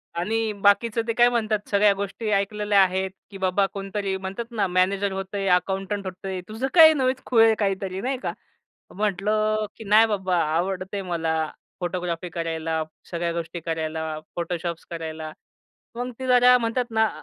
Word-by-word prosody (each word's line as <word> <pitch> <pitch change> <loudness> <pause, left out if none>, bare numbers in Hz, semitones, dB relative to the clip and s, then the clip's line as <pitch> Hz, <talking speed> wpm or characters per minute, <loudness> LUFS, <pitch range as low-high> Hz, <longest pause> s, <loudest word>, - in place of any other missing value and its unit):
"आणि 220 +5 0
बाकीचं 225 +3 +4
ते 230 - +1
काय 240 +1 +5
म्हणतात 215 -3 -1
सगळ्या 200 0 +4
गोष्टी 200 +3 -4
ऐकलेल्या 205 0 +2
आहेत, 190 0 -1 0.2
की 195 - -8
बाबा 190 +1 +2
कोणतरी 195 0 -3
म्हणतात 195 +5 -6
ना 215 -4 0
मॅनेजर 190 +2 +1
होतंय, 195 +1 -3
अकाउंटंट 195 +2 0
होतंय. 185 0 -5
तुझं 225 +5 -3
काही 320 -2 +9
नवेच 260 -2 0
खुळ 230 -3 +4
आहे 225 -1 +5
काहीतरी." 195 -1 -1
नाही 260 +2 -1
का. - - -2 0.6
म्हटलं, 215 +2 0
की 225 - -9
"नाही 215 +2 +6
बाबा 190 -4 0 0.2
आवडते 190 +2 -2
मला 165 -3 -1 0.4
फोटोग्राफी 175 -1 -3
करायला, 165 -1 -2 0.3
सगळ्या 170 0 -1
गोष्टी 170 0 -4
करायला, 160 -1 -3 0.2
फोटोशॉप्स 170 -1 -3
करायला." 160 -2 -6 0.6
मग 245 +1 -3
ते 260 - -4
जरा 250 0 +6
म्हणतात 235 +1 -1
ना 220 0 +3
195 Hz, 155 wpm, -24 LUFS, 180-215 Hz, 0.6 s, काही